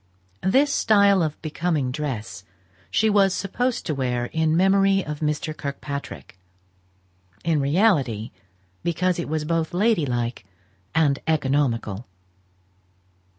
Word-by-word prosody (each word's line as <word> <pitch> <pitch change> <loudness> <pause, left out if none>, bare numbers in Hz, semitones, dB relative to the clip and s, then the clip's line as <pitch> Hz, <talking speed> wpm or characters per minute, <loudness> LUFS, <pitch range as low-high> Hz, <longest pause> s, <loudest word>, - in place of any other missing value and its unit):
This 275 +9 +3
style 200 -3 +4
of 155 -2 -2
becoming 155 -4 -1
dress 120 -10 -5 0.5
she 220 - +2
was 200 -3 +3
supposed 245 +5 -2
to 160 - -1
wear 125 -3 -2
in 160 0 +2
memory 195 +1 +3
of 150 -1 -5
Mr. 150 0 -2
Kirkpatrick; 140 -8 -6 1.0
in 160 -2 +1
reality 140 - +1 0.5
because 175 +1 0
it 170 - -4
was 155 -1 -2
both 165 +1 -1
lady 205 -6 +2
like 120 -3 -2 0.5
and 145 -4 +3
economical. 130 -8 0
155 Hz, 110 wpm, -23 LUFS, 135-190 Hz, 1.0 s, style